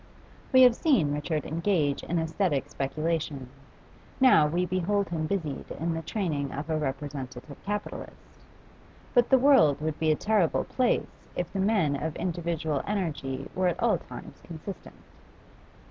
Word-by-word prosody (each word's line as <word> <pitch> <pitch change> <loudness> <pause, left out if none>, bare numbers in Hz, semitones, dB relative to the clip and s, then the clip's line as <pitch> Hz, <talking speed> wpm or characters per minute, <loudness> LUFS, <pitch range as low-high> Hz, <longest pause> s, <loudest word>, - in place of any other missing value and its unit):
We 260 -1 +8
have 250 -1 +8
seen 225 - +2
Richard 150 +1 -2
engaged 160 -3 0
in 175 - -1
asthetic 160 -2 0
speculation; 145 -2 -2 0.7
now 250 - +6
we 175 +4 0
behold 185 +3 0
him 160 -2 -2
busied 160 -8 -3
in 165 +2 -1
the 165 - -3
training 160 -5 -2
of 150 +3 -5
a 155 - +1
representative 135 -1 -5
capitalist. 205 +1 -6 0.7
But 245 -2 +4
the 265 - +7
world 255 - +5
would 155 0 -3
be 160 - +2
a - - +3
terrible 205 -2 +1
place 255 -2 -1
if 175 -1 -3
the 195 - -2
men 190 -8 +2
of 155 +2 -3
individual 165 -4 -2
energy 150 -9 -2
were 185 0 +1
at 175 -1 -1
all - - +2
times - - -11
consistent. 170 +3 -9
165 Hz, 145 wpm, -28 LUFS, 150-195 Hz, 0.7 s, We